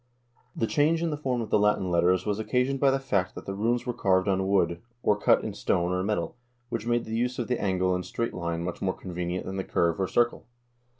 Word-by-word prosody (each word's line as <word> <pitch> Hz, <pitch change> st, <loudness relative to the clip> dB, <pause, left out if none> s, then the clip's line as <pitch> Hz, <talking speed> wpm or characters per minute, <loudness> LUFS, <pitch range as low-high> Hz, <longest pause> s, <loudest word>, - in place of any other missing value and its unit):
The 115 Hz, -, 0 dB
change 160 Hz, +6 st, +2 dB
in 165 Hz, -, 0 dB
the -, -, -1 dB
form 130 Hz, -5 st, -1 dB
of 110 Hz, -, -6 dB
the -, -, +4 dB
Latin 100 Hz, -3 st, +2 dB
letters 90 Hz, +1 st, +3 dB
was 105 Hz, 0 st, -1 dB
occasioned 125 Hz, +4 st, 0 dB
by 140 Hz, -, +4 dB
the 135 Hz, -, +2 dB
fact 100 Hz, -9 st, -1 dB
that -, -, -8 dB
the 100 Hz, -, -4 dB
runes 115 Hz, +5 st, 0 dB
were 125 Hz, -, -2 dB
carved 95 Hz, -4 st, +2 dB
on 95 Hz, -1 st, +1 dB
wood, 85 Hz, -3 st, +1 dB, 0.2 s
or 105 Hz, -, +4 dB
cut 105 Hz, -, +3 dB
in -, -, -4 dB
stone 85 Hz, 0 st, 0 dB
or 90 Hz, 0 st, 0 dB
metal, 105 Hz, +4 st, -1 dB, 0.3 s
which 115 Hz, 0 st, -3 dB
made 120 Hz, 0 st, +1 dB
the 110 Hz, -, -4 dB
use 125 Hz, +2 st, 0 dB
of 120 Hz, -, -2 dB
the 125 Hz, -, -1 dB
angle 95 Hz, -1 st, +1 dB
and 90 Hz, 0 st, -1 dB
straight 115 Hz, +6 st, -3 dB
line 85 Hz, -1 st, -3 dB
much 90 Hz, 0 st, -5 dB
more 95 Hz, -1 st, 0 dB
convenient 90 Hz, 0 st, -4 dB
than 95 Hz, +1 st, -4 dB
the 95 Hz, -, -1 dB
curve 85 Hz, 0 st, +1 dB
or 95 Hz, -, +1 dB
circle. 120 Hz, +3 st, +1 dB
100 Hz, 245 wpm, -27 LUFS, 90-120 Hz, 0.3 s, the